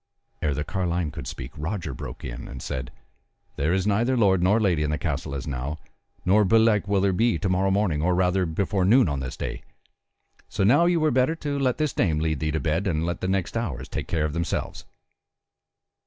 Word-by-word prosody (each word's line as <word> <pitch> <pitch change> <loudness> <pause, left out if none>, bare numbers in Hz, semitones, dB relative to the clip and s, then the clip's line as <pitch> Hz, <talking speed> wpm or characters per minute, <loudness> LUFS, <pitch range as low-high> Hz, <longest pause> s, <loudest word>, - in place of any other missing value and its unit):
Ere 75 -3 0
the 75 - -2
carline 90 -3 -1
could 80 - -7
speak - - -7
Roger 80 0 -4
broke - - -8
in - - -6
and 65 - -8
said: - - -4 0.7
"There 75 +4 0
is 95 +1 +1
neither 115 +5 +2
lord 95 -5 +4
nor 100 +5 +4
lady 90 -8 +2
in 75 - 0
the 75 - 0
castle 70 -4 -3
as 65 - -4
now, 70 +2 -3 0.5
nor 105 +4 +5
belike 110 0 +3
will 100 -1 +2
there 100 -1 +2
be 115 0 +2
to 100 - -2
morrow 95 +1 +2
morning, 95 -6 +1
or 90 +2 +2
rather, 90 0 +2
before 95 +4 0
noon 115 +5 +5
on 70 -2 -1
this 65 -2 -5
day; - - -4 0.9
so - - -1
now 140 - +5
ye 175 -1 +3
were 155 -1 +2
better 130 +5 +2
to 145 -3 -3
let 130 -3 +1
this 155 -4 0
dame 80 -5 +1
lead 80 -2 0
thee 75 - -1
to 80 +1 -1
bed, 80 +6 0
and 80 -3 0
let 85 0 -3
the 95 - -1
next 95 0 -1
hours 70 - -3
take - - -5
care 80 -2 0
of 75 - -3
themselves." 85 0 -3
90 Hz, 215 wpm, -25 LUFS, 75-105 Hz, 0.9 s, nor